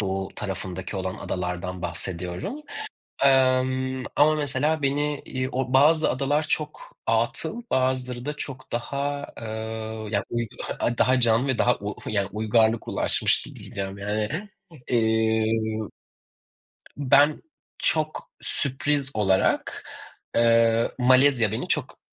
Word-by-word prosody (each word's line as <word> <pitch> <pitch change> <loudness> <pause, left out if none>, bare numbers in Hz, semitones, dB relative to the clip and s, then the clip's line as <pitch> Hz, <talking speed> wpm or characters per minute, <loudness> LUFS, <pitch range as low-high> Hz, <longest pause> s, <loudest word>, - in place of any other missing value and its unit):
Doğu 95 -1 -2
tarafındaki 95 0 -5
olan 95 0 -2
adalardan 90 0 -4
bahsediyorum. 90 - -4 0.6
Emm, 130 -1 +3
ama, 155 +2 +5
mesela, 150 +1 0
beni, 145 +1 0
iii, 130 0 -3
o 130 0 -2
bazı 155 +4 +5
adalar 140 +3 +1
çok 160 - -3
atıl, 240 - 0
bazıları 130 -1 0
da 150 +1 -3
çok 130 -3 -7
daha, 140 +4 -2
eee, - - -7 0.7
yani, 100 -1 0
uy 120 0 -1 0.5
daha 130 0 +4
canlı 115 +3 +3
ve 130 - 0
daha 125 +1 +3
u 105 +1 -5
yani, 100 -2 0
uygarlık 110 +1 +2
ulaşmış - - +1
di - - -11
diyeceğim 95 0 -6
yani. 105 +1 -1 0.6
Emm 110 -1 +1 1.1
Ben 145 +2 +4 0.4
çok 155 -1 -1
sürpriz 140 0 0
olarak, 95 -3 +1 0.5
eee, 115 0 +4
Malezya 130 -3 +4
beni 110 - -3
çok - - -1
125 Hz, 115 wpm, -25 LUFS, 105-140 Hz, 1.1 s, ama